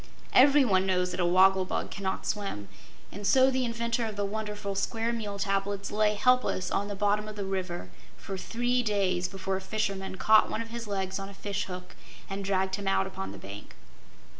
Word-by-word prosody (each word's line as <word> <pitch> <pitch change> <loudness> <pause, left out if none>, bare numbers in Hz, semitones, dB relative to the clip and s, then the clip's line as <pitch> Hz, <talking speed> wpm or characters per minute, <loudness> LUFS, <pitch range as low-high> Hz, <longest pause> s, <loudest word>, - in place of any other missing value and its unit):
Everyone 255 -9 +5
knows 180 -1 +1
that 180 - -5
a 175 - +3
wogglebug 185 +1 +3
cannot 190 -1 -3
swim, 195 - -3 0.4
and 205 +1 -4
so 265 0 +5
the 260 0 0
inventor 235 0 -1
of 215 - -6
the 205 0 -1
wonderful 210 -1 -4
Square 225 +4 -1
Meal 210 -3 -4
Tablets 195 0 -1
lay 210 0 +2
helpless 250 -6 +2
on 200 - 0
the 205 - -4
bottom 205 +1 +1
of 215 - -7
the 200 -1 -4
river 180 - -4 0.3
for 195 - -6
three 245 +6 0
days 195 -5 +1
before 190 0 -3
a - - -6
fisherman 195 -1 -2
caught 215 +3 +5
one - - -2
of 230 - -12
his 235 -1 -5
legs 190 -1 -2
on 195 0 -6
a 200 - -12
fishhook 185 -3 -5 0.3
and 195 0 -4
dragged 190 0 0
him 200 -1 -5
out 195 0 +2
upon 95 - -5
the 100 - -9
bank. 100 +1 -10
200 Hz, 190 wpm, -29 LUFS, 190-215 Hz, 0.4 s, Everyone